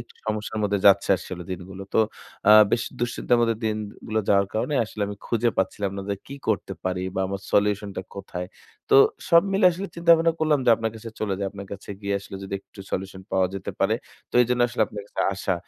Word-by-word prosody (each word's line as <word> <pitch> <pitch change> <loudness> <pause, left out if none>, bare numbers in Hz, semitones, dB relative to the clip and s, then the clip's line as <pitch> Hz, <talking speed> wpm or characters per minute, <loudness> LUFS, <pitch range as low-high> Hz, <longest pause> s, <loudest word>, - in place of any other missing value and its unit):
একটু - - -13
সমস্যার 110 0 -2
মধ্যে 100 -1 +1
যাচ্ছে 100 0 +5
আসলে 90 -1 -7
দিনগুলো। 95 +1 -6
তো - - +4 0.5
আ - - +9 0.2
বেশি 120 - +1
দুশ্চিন্তার 120 0 +1
মধ্যে 115 -1 +2
দিনগুলো 110 0 -3
যাওয়ার 100 -1 +4
কারণে 145 +7 0
আসলে 105 0 -5
আমি 105 - -6
খুঁজে 120 0 +1
পাচ্ছিলাম 95 +1 0
না - - -3
যে - - +1
কি 140 - -7
করতে 100 -2 0
পারি 90 0 -1
বা 95 - 0
আমার 100 0 -4
সলিউশন 105 0 +2
টা 95 - -2
কোথায়। 95 -2 -6 0.4
তো - - +5 0.3
সব 170 0 +7
মিলে 195 0 +2
আসলে 190 +4 -5
চিন্তা 170 0 +2
ভাবনা 165 0 +2
করলাম 155 -2 +3
যে - - +7
আপনার 115 0 -2
কাছে 110 +1 -8
চলে 100 -3 0
যাই। 100 - -1
আপনার 100 0 -9
কাছে 100 +1 -8
গিয়ে 100 -1 -1
আসলে 100 - -9
যদি 95 - -5
একটু - - -23
সলিউশন 95 0 -4
পাওয়া 95 -1 +3
যেতে 95 -1 -4
পারে। 105 +3 +3 0.4
তো - - -22
এজন্য 125 +1 0
আসলে 120 -2 0
আপনার 105 -1 -7
কাছে - - -4
আসা। 95 - -1
105 Hz, 215 wpm, -25 LUFS, 95-115 Hz, 0.5 s, আ